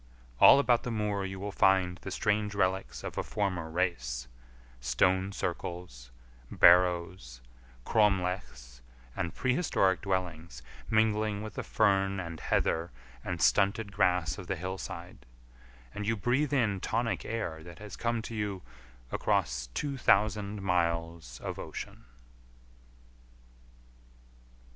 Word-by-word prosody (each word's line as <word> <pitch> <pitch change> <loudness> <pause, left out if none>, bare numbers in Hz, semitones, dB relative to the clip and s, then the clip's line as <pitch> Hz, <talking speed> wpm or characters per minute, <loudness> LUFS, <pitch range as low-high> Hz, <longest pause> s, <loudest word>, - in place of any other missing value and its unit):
All - - +9
about 125 -4 +3
the - - -5
moor 105 -3 -1
you 95 0 -6
will 100 +1 -4
find 95 -2 +3
the - - -7
strange 105 +1 0
relics 95 -1 -1
of - - -4
a - - -1
former 95 -6 -2
race: 65 -9 -2 0.5
stone 95 +10 +1
circles, 85 -9 -5 0.4
barrows, 85 -8 +4 0.5
cromlechs, 90 - 0 0.3
and 90 -3 -3
prehistoric 125 - +1
dwellings 85 - -3 0.3
mingling 110 -1 +1
with 110 -1 -7
the - - -4
fern 100 -2 +1
and 85 -3 -6
heather 85 +1 0 0.3
and 90 -1 -2
stunted 100 +1 +2
grass 90 -6 +1
of 90 - -9
the 95 - -1
hillside, 90 -3 -7 0.7
and 105 0 -5
you 115 0 +1
breathe 130 +8 +1
in 115 -8 +1
tonic 115 +4 -1
air 95 -8 -4
that 85 0 -11
has 105 -1 -9
come 115 -1 -1
to 115 - -7
you 100 -4 -3 0.5
across - - 0
two 140 -2 -2
thousand 105 -1 +2
miles 85 -7 -1
of - - -5
ocean. - - -7
95 Hz, 120 wpm, -30 LUFS, 85-105 Hz, 0.7 s, All